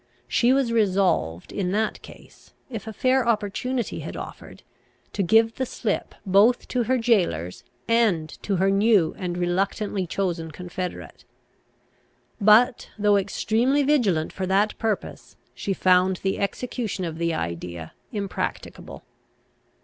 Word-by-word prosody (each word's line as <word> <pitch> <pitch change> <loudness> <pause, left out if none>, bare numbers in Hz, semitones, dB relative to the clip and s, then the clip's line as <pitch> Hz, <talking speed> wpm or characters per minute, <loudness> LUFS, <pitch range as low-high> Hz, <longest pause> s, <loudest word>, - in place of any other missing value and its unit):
She 235 +2 +3
was 265 -3 +2
resolved, 185 - +1
in 185 -3 -2
that 220 +1 -1
case, - - -16 0.2
if 225 -2 -6
a - - -4
fair 255 +3 +1
opportunity 235 +2 -1
had - - -7
offered, - - -9 0.5
to - - -1
give 225 +5 +4
the 260 - 0
slip 215 -4 -3
both 205 +6 +4
to 245 -2 0
her 260 +2 +2
jailors, 180 - 0 0.2
and 220 -9 +2
to 200 - -1
her 190 +2 +2
new 200 -4 +3
and 180 -1 -3
reluctantly 190 +2 -1
chosen 170 -3 -2
confederate. 180 +3 -7 1.2
But, 225 +5 +5
though 205 -1 +3
extremely 225 +8 +1
vigilant 220 - +1
for 185 -1 -3
that 200 +3 +2
purpose, 220 -3 -3 0.2
she 200 - -4
found 185 0 +3
the 195 0 -1
execution 210 -2 -3
of 165 -1 -5
the 170 -1 0
idea 85 0 -5 0.2
impracticable. 200 -3 -5
200 Hz, 130 wpm, -24 LUFS, 180-230 Hz, 1.2 s, But